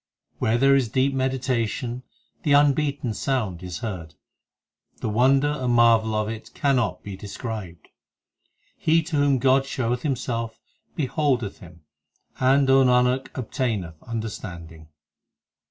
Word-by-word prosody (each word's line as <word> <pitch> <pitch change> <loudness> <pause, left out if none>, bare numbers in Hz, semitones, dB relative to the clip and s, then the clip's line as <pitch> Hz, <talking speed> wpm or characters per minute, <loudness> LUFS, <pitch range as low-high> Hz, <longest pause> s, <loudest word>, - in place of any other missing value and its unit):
Where 110 +2 +2
there 135 +2 +5
is 130 -5 +1
deep 130 +4 +1
meditation, 130 -2 -1 0.4
the 145 - +2
unbeaten 140 -3 +2
sound 110 -10 -2
is 90 +2 -6
heard; 90 -9 -6 0.8
The - - -3
wonder 135 +6 +3
and 130 -5 -1
marvel 115 -2 +4
of 110 0 0
it 110 0 -7
cannot 135 -7 0
be 100 -2 -6
described. 100 -3 -7 0.9
He 165 +1 +3
to 160 -1 -3
whom 145 -1 +3
God 135 +1 +3
showeth 125 -2 -1
Himself, 115 -5 -3 0.4
beholdeth 135 -7 -1
Him, 85 -1 -14 0.6
And, 135 +1 +4
O 135 0 +6
Nanak, 125 +1 +3
obtaineth 110 - -3
understanding. 85 -8 -7
125 Hz, 120 wpm, -24 LUFS, 110-135 Hz, 0.9 s, O